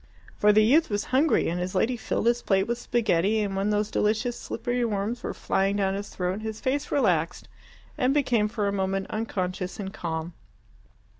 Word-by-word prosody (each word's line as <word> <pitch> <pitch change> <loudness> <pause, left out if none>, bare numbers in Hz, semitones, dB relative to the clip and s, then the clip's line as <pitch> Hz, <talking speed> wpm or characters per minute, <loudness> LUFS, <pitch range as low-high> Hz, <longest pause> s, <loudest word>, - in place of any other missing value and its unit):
For 210 - +4
the 215 +1 +5
youth 300 +9 +4
was 205 -1 -1
hungry, 285 +4 +3
and 175 +2 -1
his 180 +2 -3
lady 230 +7 +2
filled 225 - -2
his 240 +1 +2
plate 195 -1 +2
with 235 +2 -2
spaghetti, 215 -3 +1
and 200 -2 -2
when 195 +2 0
those 210 0 0
delicious 220 +3 0
slippery 240 +2 -3
worms 220 +2 -2
were - - -3
flying 195 +1 0
down 195 -1 +1
his 200 +1 -5
throat, 185 +3 -3
his 220 0 -5
face 280 +2 -1
relaxed 180 - +1 0.5
and 255 -1 +3
became 250 -7 +2
for 210 -1 -2
a - - +1
moment 195 0 -1
unconscious 185 -4 -3
and 195 -1 -5
calm. 165 0 -4
210 Hz, 190 wpm, -26 LUFS, 190-235 Hz, 0.5 s, the